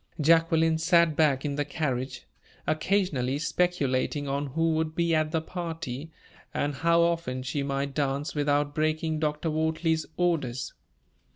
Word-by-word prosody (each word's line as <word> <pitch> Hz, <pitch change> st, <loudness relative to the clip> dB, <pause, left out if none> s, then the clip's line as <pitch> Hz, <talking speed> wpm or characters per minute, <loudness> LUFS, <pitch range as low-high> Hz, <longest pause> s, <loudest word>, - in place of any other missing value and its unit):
Jacqueline 165 Hz, +1 st, +4 dB
sat 170 Hz, -1 st, +4 dB
back 145 Hz, -3 st, +2 dB
in 140 Hz, -1 st, -2 dB
the 145 Hz, -, +1 dB
carriage, 135 Hz, -3 st, -3 dB, 0.4 s
occasionally 155 Hz, -6 st, 0 dB
speculating 145 Hz, -4 st, 0 dB
on 140 Hz, +1 st, -1 dB
who 165 Hz, +4 st, +1 dB
would 160 Hz, 0 st, -1 dB
be 170 Hz, -1 st, +1 dB
at 155 Hz, -1 st, +2 dB
the 160 Hz, 0 st, 0 dB
party, 160 Hz, -4 st, -5 dB, 0.4 s
and 145 Hz, 0 st, 0 dB
how 170 Hz, +4 st, +3 dB
often 165 Hz, -7 st, -1 dB
she 135 Hz, +2 st, -2 dB
might 140 Hz, 0 st, -2 dB
dance 140 Hz, 0 st, -1 dB
without 145 Hz, 0 st, +1 dB
breaking 155 Hz, +1 st, 0 dB
Dr. 150 Hz, +1 st, -1 dB
Wortley's 160 Hz, +1 st, 0 dB
orders. 145 Hz, -9 st, -1 dB
155 Hz, 135 wpm, -27 LUFS, 140-165 Hz, 0.4 s, Jacqueline